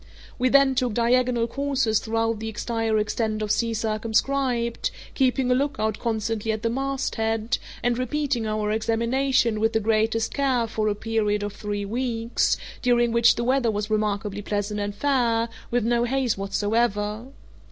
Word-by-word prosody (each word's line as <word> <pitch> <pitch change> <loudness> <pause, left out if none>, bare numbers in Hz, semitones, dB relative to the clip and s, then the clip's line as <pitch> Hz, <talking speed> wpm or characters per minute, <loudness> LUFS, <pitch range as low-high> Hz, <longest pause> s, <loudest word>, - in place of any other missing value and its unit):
We 255 +1 +3
then 275 0 +5
took 250 -4 0
diagonal 240 0 +2
courses 265 -3 0
throughout 225 0 -1
the 220 - -5
entire 225 0 -1
extent 215 0 -1
of 210 - -1
sea 225 +1 +1
circumscribed, 235 +3 0 0.2
keeping 260 -1 +1
a - - +6
lookout 250 -6 -1
constantly 225 -1 -1
at 220 0 -4
the 230 - +1
masthead, 235 -4 -1 0.2
and 245 0 +1
repeating 255 -3 -1
our 215 -1 -1
examination 230 +1 +1
with 225 +1 +1
the 220 - +3
greatest 220 +1 +1
care 265 -4 +1
for 220 -1 -2
a 210 - +1
period 210 -1 0
of 205 -1 -4
three 205 -1 -4
weeks, 230 +1 0 0.2
during 240 -1 +3
which 235 0 +5
the 235 - -2
weather 255 -1 +2
was 210 0 -2
remarkably 210 -1 -1
pleasant 205 0 -2
and 205 0 -3
fair, 235 -2 +1 0.2
with 240 -2 0
no 235 0 +2
haze 260 -2 0
whatsoever. 210 +2 -1
225 Hz, 155 wpm, -24 LUFS, 215-245 Hz, 0.2 s, a